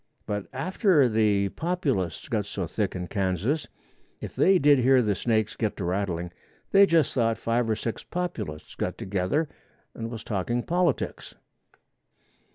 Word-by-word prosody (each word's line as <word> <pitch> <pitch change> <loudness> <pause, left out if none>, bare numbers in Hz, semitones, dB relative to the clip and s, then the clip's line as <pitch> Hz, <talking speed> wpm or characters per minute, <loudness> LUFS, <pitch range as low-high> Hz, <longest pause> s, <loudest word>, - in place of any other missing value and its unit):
But 105 -2 -3
after 155 - +3
the 105 -3 +2
Populists 135 - -2
got 105 -3 -1
so 95 -3 -3
thick 95 +5 -2
in 90 -1 -3
Kansas, 100 - -1 0.5
if - - -7
they 190 0 +5
did 145 -4 +5
hear 130 +1 +5
the 105 -2 +1
snakes 110 +1 0
get 110 -2 -2
to 95 - -3
rattling, 90 -2 -2 0.4
they 200 0 +7
just 165 -5 +3
thought 115 -3 +1
five 115 0 0
or 110 - +2
six 115 +1 -4
Populists 175 - -5
got - - -3
together 100 - -1 0.5
and 115 0 -5
was 115 -2 -7
talking 120 +4 -1
politics. 175 -4 -1
115 Hz, 150 wpm, -26 LUFS, 100-145 Hz, 0.5 s, they